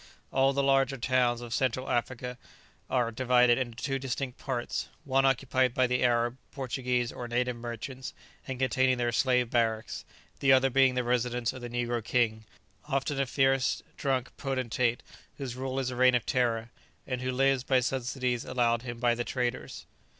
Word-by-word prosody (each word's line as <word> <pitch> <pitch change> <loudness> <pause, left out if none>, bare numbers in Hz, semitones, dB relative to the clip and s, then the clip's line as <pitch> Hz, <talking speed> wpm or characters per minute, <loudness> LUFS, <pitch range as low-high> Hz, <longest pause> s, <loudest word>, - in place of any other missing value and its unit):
All 135 0 +4
the 140 0 0
larger 135 0 +3
towns 125 -1 +1
of 120 -1 -6
Central 130 0 0
Africa 125 +1 -2 0.5
are 120 -2 +1
divided 125 +1 +4
into 120 -3 -3
two 135 -1 -1
distinct 135 -1 -4
parts; 125 -3 -3
one 135 -1 +2
occupied 130 -1 +1
by 130 - +4
the 125 0 0
Arab, 120 0 +2
Portuguese, 125 -3 -1
or 120 - -6
native 125 +1 0
merchants, 120 +3 -6 0.3
and 130 -1 -4
containing 130 0 +2
their 120 -1 0
slave 125 -1 +2
barracks; 110 -2 0 0.4
the 135 - +4
other 135 0 +4
being 135 0 +4
the 125 - +1
residence 120 0 0
of 130 - -9
the 120 - -6
negro 120 -1 -2
king, 110 -1 0 0.4
often 135 0 0
a 135 - 0
fierce 135 0 +2
drunken 130 -3 -1
potentate, 125 -3 -1 0.3
whose 130 -4 -5
rule 130 +1 -4
is 130 -1 -1
a - - -5
reign 125 0 +5
of 120 - 0
terror, 115 -2 0 0.3
and 125 -2 -3
who 130 0 -1
lives 135 0 +2
by 130 -1 +3
subsidies 125 -1 -1
allowed 120 -2 +1
him 120 -1 -6
by 120 -1 +3
the 120 +1 -2
traders. 125 -1 -3
125 Hz, 170 wpm, -29 LUFS, 120-130 Hz, 0.5 s, reign